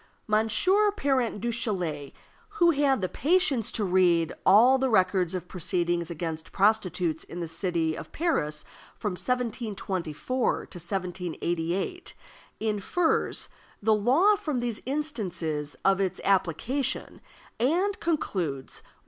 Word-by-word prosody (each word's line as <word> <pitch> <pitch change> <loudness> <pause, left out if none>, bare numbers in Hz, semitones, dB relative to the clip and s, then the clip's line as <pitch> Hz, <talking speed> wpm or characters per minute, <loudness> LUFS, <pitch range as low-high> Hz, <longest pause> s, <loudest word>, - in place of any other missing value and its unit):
Monsieur 230 - +3
Parent 265 - 0
Duchatelet, 190 - -2 0.5
who 345 -3 +5
had 275 -5 +2
the 185 - 0
patience 285 - +2
to 220 - -1
read 175 -3 +3
all 240 +7 +7
the 265 0 +1
records 185 -4 +2
of 180 -1 -5
proceedings 175 -1 -1
against 160 -1 -5
prostitutes 185 -6 +1
in 175 - -8
the 170 - -3
city 165 -1 0
of - - -9
Paris 155 - -1 0.3
from 210 - -2
1724 220 - -2
to - - -2 0.2
1788, 180 - -3 0.4
infers 220 - 0 0.3
the 220 +1 +3
law 270 - +4
from 310 -10 -2
these 240 -3 -3
instances 180 - -2
of 195 0 +4
its 190 -2 -1
application, 200 - 0 0.4
and 365 - +1
concludes: 180 - -2
(1.) - - -26
200 Hz, 115 wpm, -27 LUFS, 175-260 Hz, 0.5 s, all